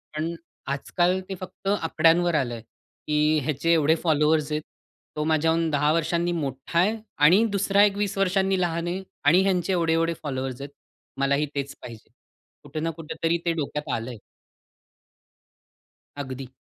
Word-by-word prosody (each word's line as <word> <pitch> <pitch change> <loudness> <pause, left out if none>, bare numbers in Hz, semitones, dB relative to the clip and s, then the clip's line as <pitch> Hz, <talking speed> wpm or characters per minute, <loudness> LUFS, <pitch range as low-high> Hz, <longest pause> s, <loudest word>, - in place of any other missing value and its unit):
पण 160 +2 -2 0.4
आजकाल 175 +6 0
ते 190 - -3
फक्त 190 +1 -9
आकड्यांवर 165 +1 +3
आलं 125 -5 0
आहे, 115 - -8
की 150 +5 -1
ह्याचे 155 +4 +1
एवढे 160 0 +4
फॉलोवर्स 155 -1 +2
आहेत. 150 0 -1 0.5
तो 150 - -1
माझ्याहून 160 +1 +2
10 150 +1 +2
वर्षांनी 170 +1 0
मोठा 140 0 -2
आहे 210 +6 +3 0.3
आणि 185 +8 +6
दुसरा 200 0 +3
1 200 -1 +2
20 205 -1 -2
वर्षांनी 190 0 +2
लहान 170 -1 -1
आहे 185 +2 -3 0.2
आणि 170 +6 +6
ह्यांचे 190 -1 +1
एवढे-एवढे 165 -1 +1
फॉलोवर्स 130 -2 -4
आहेत. 140 - -6 0.5
मलाही 140 +2 +2
तेच 140 0 -3
पाहिजे. 115 -2 -11 0.5
कुठे 145 +2 -6
ना 165 +2 -1
कुठेतरी 165 +1 -2
ते 170 - +2
डोक्यात 150 -1 -4
आलं 115 +2 -3
आहे. 120 - -7 2.1
अगदी. 130 0 -7
160 Hz, 150 wpm, -25 LUFS, 145-175 Hz, 2.1 s, आणि